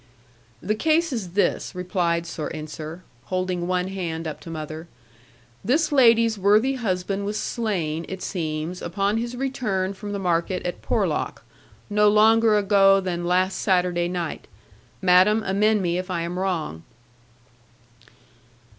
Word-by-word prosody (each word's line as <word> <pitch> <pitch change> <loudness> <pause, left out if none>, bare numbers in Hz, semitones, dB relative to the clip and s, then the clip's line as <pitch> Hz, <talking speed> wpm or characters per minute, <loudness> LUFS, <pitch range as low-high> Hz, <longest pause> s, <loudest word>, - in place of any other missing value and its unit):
'The 205 +4 0
case 315 +6 +1
is 190 -8 -4
this,' 200 -1 0
replied 175 -2 -1
Sir 160 -2 -5
Ensor, 155 +3 -7 0.2
holding 185 -1 -2
one 180 0 0
hand 170 -4 -4
up 155 - -6
to - - -11
mother: 155 +1 -6 0.8
'This 300 +9 +1
lady's 230 -5 +4
worthy 210 +7 +4
husband 195 -5 -2
was 210 +1 -2
slain, 170 -9 -2
it 190 -1 -6
seems, 160 0 -3
upon 195 +5 -1
his 235 +2 -3
return 220 -8 -2
from 205 +1 -7
the 205 - -2
market 180 0 -1
at 175 - -4
Porlock, - - -1 0.4
no 210 0 +4
longer 220 +1 +5
ago 195 -1 +5
than 175 -2 -3
last 185 +2 +1
Saturday 180 -2 +1
night. 175 -2 -4 0.6
Madam, 190 +4 +5
amend 210 +1 +2
me 175 0 0
if 185 +1 -6
I 175 -2 -1
am 175 +2 -4
wrong.' 170 - -2
185 Hz, 135 wpm, -24 LUFS, 175-210 Hz, 0.8 s, longer